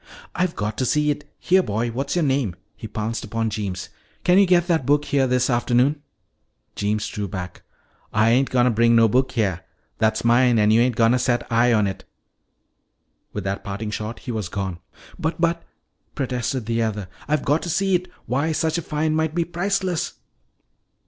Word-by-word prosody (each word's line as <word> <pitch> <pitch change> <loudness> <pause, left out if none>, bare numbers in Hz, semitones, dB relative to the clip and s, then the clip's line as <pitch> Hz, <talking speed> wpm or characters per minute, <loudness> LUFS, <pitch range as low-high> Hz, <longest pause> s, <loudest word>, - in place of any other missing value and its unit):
"I've 180 -2 -1
got 105 +1 -3
to 130 - +1
see 150 +2 +2
it! 145 0 -6
Here, 185 +1 +3
boy, 115 - -2
what's 135 +5 -3
your 175 -3 +2
name?" 130 -10 0 0.2
He 110 - -8
pounced 110 +2 -3
upon 115 +1 -2
Jeems. 100 -4 -4 0.3
"Can 180 +1 +5
you 200 - +5
get 175 -1 +4
that 170 -5 +1
book 145 +3 +2
here 135 -2 +2
this 125 0 +2
afternoon?" 125 +4 +2 0.7
Jeems 105 +1 -1
drew 105 -1 -4
back. 90 -1 -6 0.5
"Ah 110 +1 +3
ain't 125 +4 +3
gonna 125 -1 +3
bring 115 +1 +4
no 115 -1 +6
book 130 +4 +1
heah. 105 -8 0 0.4
That's 110 0 +1
mine 120 0 +4
an' 105 0 +4
you 115 +2 +5
ain't 125 -1 +2
gonna 115 +2 +3
set 120 -1 0
eye 120 +1 +4
on 105 -3 +3
it!" 95 -1 -4 1.3
With 105 - -5
that 95 +1 -3
parting 105 +2 -4
shot 110 +2 -4
he 125 - -5
was 110 -6 -3
gone. 95 -3 -4 0.4
"But 160 +2 -2
but 170 0 +1 0.3
" - - -46
protested 125 -2 -2
the 115 +1 0
other, 105 -4 -2 0.2
"I've 150 0 0
got 145 +3 +2
to 175 - -5
see 195 +3 +1
it. 180 0 +1 0.2
Why, 145 +6 0
such 160 +2 0
a - - -4
find 155 0 -1
might 160 0 0
be 170 -1 +1
priceless." 180 0 -1
125 Hz, 190 wpm, -22 LUFS, 110-150 Hz, 1.3 s, no